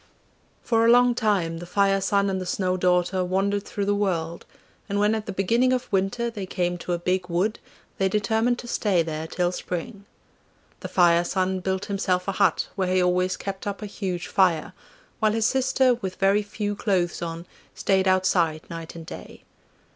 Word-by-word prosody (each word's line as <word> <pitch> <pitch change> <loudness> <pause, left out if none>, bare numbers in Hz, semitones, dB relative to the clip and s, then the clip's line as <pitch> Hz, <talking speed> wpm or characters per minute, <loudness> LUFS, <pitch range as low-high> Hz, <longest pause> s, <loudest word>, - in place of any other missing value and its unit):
For 225 -1 +2
a 230 - +5
long 245 +1 +6
time 195 -8 0
the 175 - -8
Fire 195 +1 +2
son 200 +1 +2
and 190 -1 -1
the - - -4
Snow 185 0 0
daughter 180 0 +1
wandered 195 +3 0
through 200 - -3
the 205 - +2
world, 170 -5 -2 0.4
and 200 +1 0
when 210 +1 +3
at 220 -1 -3
the - - -3
beginning 230 +7 +2
of 255 0 -3
winter 200 +5 0
they 200 -4 -6
came 175 -1 -1
to 175 - -3
a - - 0
big 180 +1 -1
wood 185 +6 0 0.4
they 190 0 +2
determined 220 +4 +1
to 240 - -9
stay 195 -7 +1
there 160 0 -4
till 175 +1 0
spring. 195 +4 -5 0.7
The - - -6
Fire 175 -1 +4
son 185 +1 -1
built 190 +1 -2
himself 185 -2 -1
a - - +1
hut 195 -3 +2
where 185 -2 -1
he 185 0 +3
always 180 +1 +1
kept 195 0 -6
up 205 +1 -4
a - - -3
huge 190 -4 -4
fire, 185 -3 +1 0.5
while 215 -1 +2
his 225 -1 +1
sister 265 0 +3
with 195 -6 -5
very 195 +2 +3
few 205 0 -4
clothes 185 -4 0
on 165 0 -5 0.3
stayed 190 -1 +1
outside 180 -4 +2
night 165 0 -7
and 165 -1 -8
day. - - -10
190 Hz, 190 wpm, -25 LUFS, 180-205 Hz, 0.7 s, long